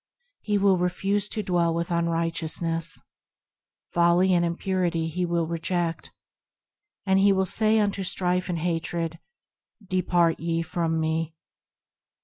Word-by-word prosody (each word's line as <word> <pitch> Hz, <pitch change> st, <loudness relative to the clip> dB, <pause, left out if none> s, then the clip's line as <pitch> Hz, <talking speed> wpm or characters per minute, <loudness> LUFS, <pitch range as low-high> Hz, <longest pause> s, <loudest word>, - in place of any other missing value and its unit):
He 210 Hz, -1 st, 0 dB
will 195 Hz, -2 st, +3 dB
refuse 195 Hz, +3 st, 0 dB
to 215 Hz, -, -3 dB
dwell 170 Hz, -3 st, +1 dB
with 170 Hz, +1 st, -2 dB
unrighteousness. 165 Hz, -1 st, -1 dB, 0.9 s
Folly 175 Hz, +2 st, +4 dB
and 175 Hz, -1 st, +3 dB
impurity 170 Hz, -1 st, -1 dB
he 175 Hz, +2 st, -2 dB
will 170 Hz, -1 st, 0 dB
reject, 170 Hz, +1 st, -2 dB, 1.0 s
And 190 Hz, -1 st, +3 dB
he 200 Hz, +1 st, +5 dB
will 190 Hz, -1 st, +2 dB
say 215 Hz, +3 st, +2 dB
unto 205 Hz, -2 st, +1 dB
strife 180 Hz, 0 st, -1 dB
and 175 Hz, -, -1 dB
hatred, 165 Hz, 0 st, -2 dB, 0.3 s
" 210 Hz, -, -28 dB
Depart 175 Hz, -2 st, +2 dB
ye 165 Hz, 0 st, -1 dB
from 165 Hz, -1 st, -1 dB
me." 160 Hz, 0 st, -1 dB
175 Hz, 125 wpm, -26 LUFS, 165-185 Hz, 1.0 s, he